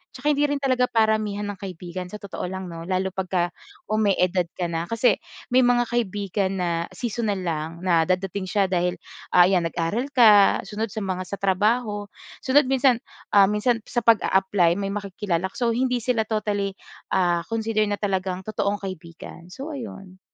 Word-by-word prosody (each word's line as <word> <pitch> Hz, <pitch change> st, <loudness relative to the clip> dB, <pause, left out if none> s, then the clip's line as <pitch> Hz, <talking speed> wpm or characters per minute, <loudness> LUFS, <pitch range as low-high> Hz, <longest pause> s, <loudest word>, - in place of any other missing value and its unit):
'tsaka 300 Hz, -, +1 dB
hindi 290 Hz, 0 st, +1 dB
rin 290 Hz, -, -1 dB
talaga 255 Hz, -2 st, +2 dB
paramihan 215 Hz, -2 st, +1 dB
ng 195 Hz, -, -11 dB
kaibigan 180 Hz, -1 st, -6 dB
sa 180 Hz, -, -9 dB
totoo 200 Hz, -3 st, -6 dB
lang 190 Hz, -1 st, -6 dB
'no, 165 Hz, +1 st, -8 dB
lalo 190 Hz, 0 st, 0 dB
'pagka 185 Hz, -2 st, -1 dB, 0.4 s
umi-edad 190 Hz, -4 st, +2 dB
ka 175 Hz, -2 st, -2 dB
na, 165 Hz, +1 st, -2 dB
kasi 230 Hz, +2 st, +2 dB, 0.3 s
may 255 Hz, 0 st, +5 dB
mga 245 Hz, 0 st, +4 dB
kaibigan 200 Hz, -4 st, -1 dB
na 175 Hz, -, 0 dB, 0.3 s
seasonal 225 Hz, -4 st, -2 dB
lang 160 Hz, -2 st, -2 dB
na 170 Hz, -3 st, +3 dB
dadating 185 Hz, +1 st, -1 dB
siya 195 Hz, -1 st, +1 dB
dahil, 180 Hz, 0 st, +1 dB, 0.4 s
ah, 180 Hz, -, +9 dB
ayan 180 Hz, -2 st, +3 dB
nag-aral 170 Hz, +10 st, -2 dB
ka, 210 Hz, -5 st, +6 dB
sunod 215 Hz, +3 st, -3 dB
sa 215 Hz, -, -3 dB
mga 185 Hz, -1 st, -3 dB
sa 200 Hz, -, -4 dB
trabaho, 205 Hz, +2 st, 0 dB, 0.3 s
sunod 270 Hz, 0 st, +3 dB
minsan, 255 Hz, -2 st, +3 dB, 0.3 s
ah, 195 Hz, -1 st, +8 dB
minsan 225 Hz, +2 st, +1 dB
sa 240 Hz, -, -1 dB
pag-aapply 190 Hz, -5 st, +3 dB
may 195 Hz, 0 st, -2 dB
makikilala 190 Hz, -3 st, -2 dB
ka. -, -, -10 dB
So 235 Hz, -2 st, +1 dB
hindi 250 Hz, 0 st, +1 dB
sila 230 Hz, -1 st, 0 dB
totally 205 Hz, -2 st, -1 dB, 0.4 s
ah, 175 Hz, -2 st, +2 dB
consider 220 Hz, -1 st, +1 dB
na 205 Hz, -1 st, -2 dB
talagang 190 Hz, -1 st, -2 dB
totoong 205 Hz, -1 st, -1 dB
kaibigan. 175 Hz, -1 st, -9 dB
So, 280 Hz, +10 st, -6 dB
ayon. 195 Hz, -7 st, -9 dB
200 Hz, 170 wpm, -24 LUFS, 185-225 Hz, 0.4 s, ah